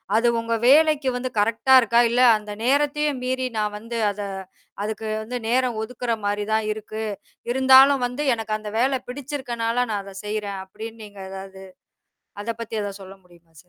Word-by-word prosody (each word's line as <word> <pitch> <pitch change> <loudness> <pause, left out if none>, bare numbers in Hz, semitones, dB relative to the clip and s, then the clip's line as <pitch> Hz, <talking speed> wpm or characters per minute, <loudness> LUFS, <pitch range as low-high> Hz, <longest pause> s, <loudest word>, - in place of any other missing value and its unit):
அது 235 +2 +3
உங்க 230 0 -2
வேலைக்கு 300 -1 +5
வந்து 255 +1 -3
கரெக்ட்டா 230 +5 +2
இருக்கா? 235 -1 +3
"இல்ல, 245 +2 +2 0.2
அந்த 210 0 -9
நேரத்தையும் 290 +2 +1
மீறி 260 0 -1
நான் 210 -1 -1
வந்து 230 +2 -6
அத 205 +1 -7 0.6
அதுக்கு 220 +1 -4 0.2
வந்து 245 +3 -4
நேரம் 245 -1 +1
ஒதுக்குற 240 +1 -4
மாரி 205 0 0
தான் 220 0 +1
இருக்கு. 215 +1 -5 0.5
இருந்தாலும் 265 +1 +6
வந்து 250 +4 -3
எனக்கு 220 -2 -3
அந்த 215 -1 -7
வேலை 260 +1 +2
பிடிச்சிருக்கனால 250 -4 -3
நான் 205 -1 -1
அதை 195 -1 -11
செய்றேன்." 205 -2 -3
அப்படின்னு 225 +3 -9
நீங்க 205 -1 -14
எதாவது 190 0 -9 0.8
அத 230 - -3
பத்தி 230 -1 -5
எதாவது 200 -1 -6
சொல்ல 190 +1 -11
முடியுமா 175 -1 -21
சார்? - - -34
230 Hz, 165 wpm, -23 LUFS, 210-260 Hz, 0.8 s, இருந்தாலும்